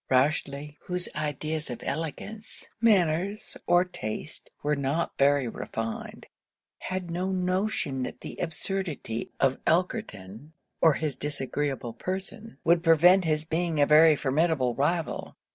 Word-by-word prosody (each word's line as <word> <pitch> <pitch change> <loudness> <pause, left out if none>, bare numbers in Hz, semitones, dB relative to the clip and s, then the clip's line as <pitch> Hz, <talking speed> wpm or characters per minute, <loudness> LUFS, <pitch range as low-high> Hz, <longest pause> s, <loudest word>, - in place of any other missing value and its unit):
Rochely, 140 +2 +1
whose 180 -1 -1
ideas 155 0 -3
of 120 - -6
elegance, 165 +9 -5 0.2
manners, 195 -1 +2
or 175 +1 +5
taste, 110 - -6
were 150 +1 +2
not 140 +4 -1
very 140 -2 +4
refined, 115 0 -5 0.5
had 185 -2 -4
no 180 +3 -1
notion 185 -6 -1
that - - -5
the - - -7
absurdity 165 - -3
of 135 -1 +2
Elkerton, 155 - -1 0.3
or 160 - +6
his 150 -2 -2
disagreeable 140 -3 -2
person, 190 - -5
would 170 0 +4
prevent 175 +3 +6
his 155 -1 0
being 165 -1 -1
a 145 - +6
very 155 +1 +7
formidable 140 -2 +1
rival. 160 +5 -1
155 Hz, 125 wpm, -27 LUFS, 140-180 Hz, 0.5 s, very